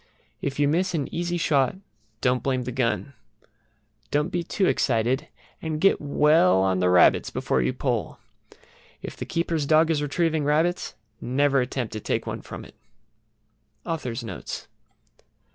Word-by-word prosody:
If 140 -1 -3
you 145 - +4
miss 180 +4 +1
an 145 -4 -3
easy 175 +1 -1
shot 140 -5 +2 0.5
don't 125 -1 +2
blame 130 -1 -1
the 125 - -4
gun. 130 +3 -1 1.0
Don't 150 +3 +1
be 175 - -1
too 190 +3 0
excited, 130 +1 +1 0.3
and 155 -1 -3
get 195 +4 +3
well 145 - +4
on 95 -1 +1
the 90 0 +2
rabbits 90 0 +5
before 65 - 0
you 65 +1 +1
pull. - - -2 0.9
If - - -6
the - - -7
keeper's 165 -3 -1
dog 160 +1 +4
is 150 -2 +1
retrieving 160 +1 0
rabbits 160 +3 0 0.3
never 135 +2 +2
attempt 125 -2 -3
to 110 - -4
take - - -2
one - - -5
from - - -9
it. - - -15 1.1
AUTHOR'S 130 -8 -3
NOTES. 115 - -7
145 Hz, 150 wpm, -25 LUFS, 125-160 Hz, 1.1 s, rabbits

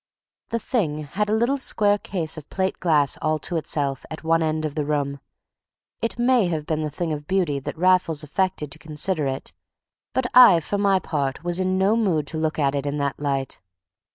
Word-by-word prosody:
The 230 - 0
thing 175 - -1
had 200 +9 -2
a 215 - +2
little 240 +5 +1
square 205 -5 +2
case 170 -6 -3
of 155 -3 -10
plate 190 0 -2
glass 150 -6 +2
all 155 0 +1
to 175 - -2
itself 140 -4 -1
at 160 - -8
one 165 +1 +2
end 155 0 0
of 150 - -3
the 150 -1 -1
room. 140 -1 -1 0.8
It 230 +1 -2
may 240 -4 +3
have 160 -3 -2
been 155 0 -1
the 155 - -2
thing 160 +2 -3
of 150 -1 -6
beauty 175 -7 +1
that 135 - -6
Raffles 180 -3 +3
affected 170 -1 -1
to - - -7
consider 155 0 -1
it, 135 0 -4 0.6
but 260 - 0
I 250 -9 +9
for 200 +6 -3
my 200 -1 +3
part 140 -4 -2
was 175 +1 -1
in 185 0 +1
no 195 +3 +3
mood 185 -10 +1
to 160 - -4
look 155 0 -1
at 140 -2 +1
it 140 0 -2
in 145 +1 -2
that 140 -2 -2
light. 140 -2 -2
160 Hz, 210 wpm, -23 LUFS, 150-190 Hz, 0.8 s, I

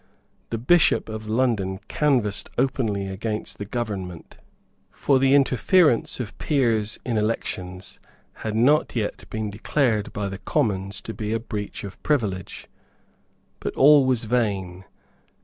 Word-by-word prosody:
The 115 - -2
Bishop 155 +2 +3
of 110 0 -6
London 110 -5 0
canvassed 125 -9 0
openly 115 -7 0
against 105 +3 -4
the 100 - -4
government; 100 -8 -5 0.5
for 135 -2 +1
the 135 +1 +4
interference 135 - +3
of 115 -5 -5
peers 115 -7 +1
in 120 -3 -1
elections 95 -4 -4 0.4
had 110 -1 -3
not 140 +8 +3
yet 110 -3 -3
been 110 -1 -3
declared 110 0 0
by 100 -1 -3
the 95 0 -6
Commons 100 -4 -1
to 110 - -6
be 105 0 -3
a 115 - 0
breach 105 -3 -6
of 100 -1 -9
privilege. 105 - -1 0.9
But - - -4
all 145 0 +7
was 125 -3 +1
vain. 100 -6 -1
110 Hz, 130 wpm, -24 LUFS, 100-130 Hz, 0.9 s, all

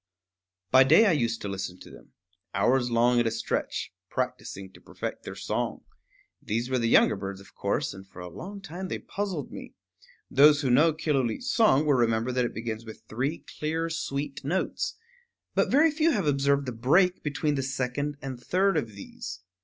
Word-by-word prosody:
By 130 0 +8
day 160 +12 +6
I 200 - +5
used 120 -7 0
to - - -3
listen 95 -2 -4
to - - -12
them, - - -16 0.4
hours 125 +5 +2
long 120 +1 +3
at 120 - +2
a - - +3
stretch, 110 - -3 0.2
practicing 125 -7 -4
to - - -16
perfect - - -6
their - - -6
song. - - -3 0.6
These 115 +4 -2
were 130 - +2
the 115 -1 +1
younger - - +5
birds, 95 0 -6
of 100 - -16
course; - - -1
and 95 0 -11
for 95 - -13
a 90 - -6
long 195 - -8
time 185 +1 -6
they - - -3
puzzled 190 -9 -4
me. - - -9 0.5
Those 145 +2 +6
who 130 -4 +1
know 150 +7 +5
Killooleet's 150 - -1
song 185 - +4
will 145 - +4
remember 115 -1 +2
that 125 -1 +1
it - - -4
begins 115 0 -4
with 110 -1 -11
three 135 +8 -3
clear 160 +2 -1
sweet 145 -3 -3
notes; 190 - -2 0.6
but - - +2
very 305 +4 +5
few 310 +2 +2
have 210 - +1
observed 140 -1 +2
the 130 - -3
break 165 +11 +3
between 150 0 -1
the 140 - -1
second 135 +2 -2
and 130 -2 -5
third 195 +6 +2
of 110 -2 -2
these. 95 -1 -8
135 Hz, 190 wpm, -27 LUFS, 115-160 Hz, 0.6 s, By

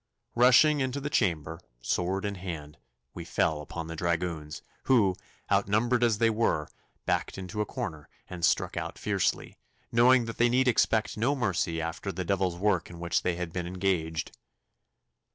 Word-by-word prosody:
Rushing 130 +5 +6
into 130 +1 -1
the 145 +1 -4
chamber, 80 - 0 0.2
sword 95 - -1
in 100 - -1
hand, 85 -6 -7 0.3
we 85 - -7
fell 80 -2 0
upon 80 +2 -6
the 80 0 -6
dragoons, 85 -2 -2 0.2
who, 105 -8 +4 0.4
outnumbered 120 +4 +2
as 115 -3 +3
they 115 +1 +3
were, 105 -9 0 0.4
backed - - -1
into 95 +3 -4
a 105 - -2
corner 80 -2 -5 0.2
and 90 -2 -8
struck - - +2
out - - -4
fiercely, - - -1 0.3
knowing 120 +1 +5
that 115 - -6
they 120 0 +5
need 130 +2 +2
expect 110 -3 +2
no 125 +7 +1
mercy 95 -9 -1
after 80 +4 -4
the 90 0 -4
devil's 95 -2 0
work 95 -3 +1
in 85 -1 -10
which 85 0 0
they 90 - 0
had 85 -1 -5
been 90 -2 -3
engaged. 90 -4 -2
95 Hz, 165 wpm, -28 LUFS, 85-115 Hz, 0.4 s, Rushing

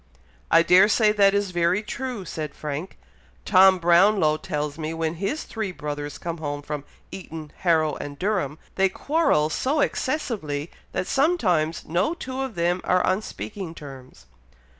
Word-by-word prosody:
"I 165 - +6
dare 185 +4 +6
say 215 -1 +4
that 200 -1 +4
is 200 -2 0
very 175 +3 +1
true," 240 -2 -5
said 155 -4 -5
Frank. 150 +4 -5 0.5
"Tom 190 -1 +6
Brownlow 175 -1 +4
tells 150 0 -4
me 160 +1 -3
when 160 -1 -1
his 210 +11 -1
three 220 -4 -4
brothers 145 -3 -5
come 170 -1 -5
home 145 -2 -4
from 145 -1 -5 0.3
Eton, 160 -5 -8
Harrow, 160 -4 +2
and 145 0 -7
Durham, 180 -7 -1 0.2
they 195 0 +4
quarrel 280 - +1
so 280 - 0
excessively, 210 - -2 0.2
that - - -2
sometimes 185 - +1
no 180 - 0
two 265 -5 -5
of 265 -5 -4
them 175 +1 0
are 180 0 +2
on 185 +3 +1
speaking 195 -5 -7
terms." 130 - -12
175 Hz, 155 wpm, -24 LUFS, 155-210 Hz, 0.5 s, I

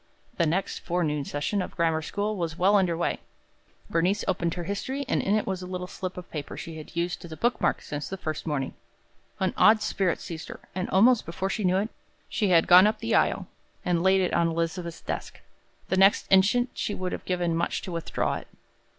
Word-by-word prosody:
The 170 - +3
next 180 +5 -1
forenoon 155 -5 -1
session 145 +9 -1
of - - -4
the - - -22
grammar 165 -2 +1
school 205 +6 -2
was 170 -3 -3
well 195 +3 +4
under 180 -4 +2
way. 170 - -1 0.7
Bernice 180 +5 +1
opened 175 -3 0
her 175 - -4
history, 260 +10 -3
and - - +1
in 200 - +1
it 215 - +1
was 190 -1 -3
a 180 - -6
little 180 0 -4
slip 185 0 -6
of 180 - -9
paper 150 -3 -5
that - - -8
she 165 -1 -7
had 155 - -12
used 170 +1 -2
as 170 - -10
a 160 - -7
book 240 +1 0
mark - - +1
since 145 0 -5
that 195 - -5
first 155 0 -4
morning. 140 -4 -1 0.7
An 190 -1 +1
odd 215 0 +6
spirit 190 -4 0
seized 160 -2 -7
her, - - -8
and 185 0 -3
almost 225 +5 +5
before 190 +4 -3
she 215 - -2
knew 185 0 +3
it, 205 +3 0 0.4
she 215 -6 0
had 165 -2 +5
gone 185 +3 +8
up 215 +1 0
the 225 0 -2
aisle, 195 -2 +2 0.4
and 175 -2 +1
laid 190 +1 +4
it 180 - 0
on 170 - +3
Elizabeth's 165 0 -3
desk. - - -5 0.5
The 190 - +1
next 195 +2 +5
instant 205 +6 +4
she 205 - -2
would 185 -1 -3
have - - -5
given 175 -2 0
much 170 - -1
to 185 - -6
withdraw 165 -1 -1
it. - - -10
180 Hz, 225 wpm, -27 LUFS, 165-195 Hz, 0.7 s, gone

